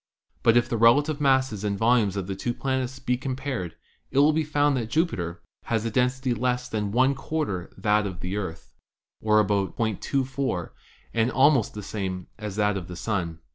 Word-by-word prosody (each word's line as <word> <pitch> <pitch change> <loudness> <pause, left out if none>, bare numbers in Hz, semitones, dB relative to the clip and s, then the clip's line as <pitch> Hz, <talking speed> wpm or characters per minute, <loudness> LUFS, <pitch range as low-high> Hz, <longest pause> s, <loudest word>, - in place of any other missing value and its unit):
But 115 0 +5
if 120 0 +3
the 115 - -1
relative 145 +7 +4
masses 130 -7 +2
and 100 -1 -1
volumes 110 -3 +3
of 95 - -2
the 95 +1 -4
two 120 +5 -3
planets 130 -1 -2
be 125 -2 -1
com 130 0 -3
pared, 130 - -4 0.3
it 135 - -4
will 145 +2 +6
be 160 +1 +1
found 145 -1 +2
that 115 -4 -2
Jupiter 90 - -1 0.2
has 115 -1 0
a 115 - -1
density 125 +2 +1
less 125 +1 -1
than 105 -4 -2
one 130 +5 +3
quarter 135 - -3
that 105 +1 +2
of 90 -2 -7
the 90 +2 -3
Earth, 85 -5 -5 0.5
or 105 -1 +4
.24, 110 +2 -1 0.4
and 115 +1 +2
almost 130 -5 +3
the 105 - -6
same 95 -3 -4
as 105 -3 -5
that 105 -1 +1
of 90 -3 -6
the 90 - -7
Sun. 85 -3 -3
115 Hz, 185 wpm, -26 LUFS, 100-130 Hz, 0.5 s, will